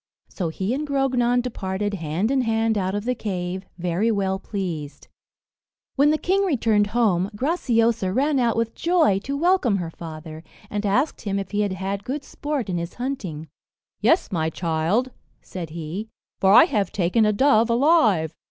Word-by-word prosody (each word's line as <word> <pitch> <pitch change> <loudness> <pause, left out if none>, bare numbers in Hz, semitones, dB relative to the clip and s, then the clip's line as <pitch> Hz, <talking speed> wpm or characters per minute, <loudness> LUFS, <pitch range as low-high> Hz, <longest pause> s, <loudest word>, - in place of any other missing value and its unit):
So 175 -4 -3
he 190 +7 -2
and 295 +3 -3
Grognon 250 -3 +1
departed 205 -4 -3
hand 175 - -1
in 275 -1 +2
hand 225 -1 +1
out 190 -1 -1
of 205 +1 -3
the 250 - +1
cave, 185 -4 -4
very 180 +5 0
well 195 -3 0
pleased. 175 -8 -5 0.9
When 285 +2 +4
the 310 - +3
king 385 +5 +1
returned 225 - +2
home, 205 -5 +1
Graciosa 230 - +1
ran 275 +6 +1
out 235 -2 +1
with 230 0 -1
joy 330 - +2
to 275 +7 -4
welcome 330 - +2
her 170 -3 -4
father, 160 -1 -9 0.3
and 210 0 -1
asked 260 +10 +1
him 200 -2 -2
if 195 - -4
he 210 0 0
had 200 -2 0
had 195 +1 -4
good 275 +5 -4
sport 290 -4 -4
in 180 -2 -2
his 170 +1 -6
hunting. 195 - -4 0.5
"Yes, 330 - +2
my 160 -3 0
child," 170 +10 0 0.3
said 175 -4 -7
he, 170 +6 -5 0.3
"for 190 - +4
I 235 +11 +9
have 210 - 0
taken 190 +4 +1
a 210 - +4
dove 230 0 +3
alive." 230 - +3
210 Hz, 170 wpm, -23 LUFS, 185-255 Hz, 0.9 s, I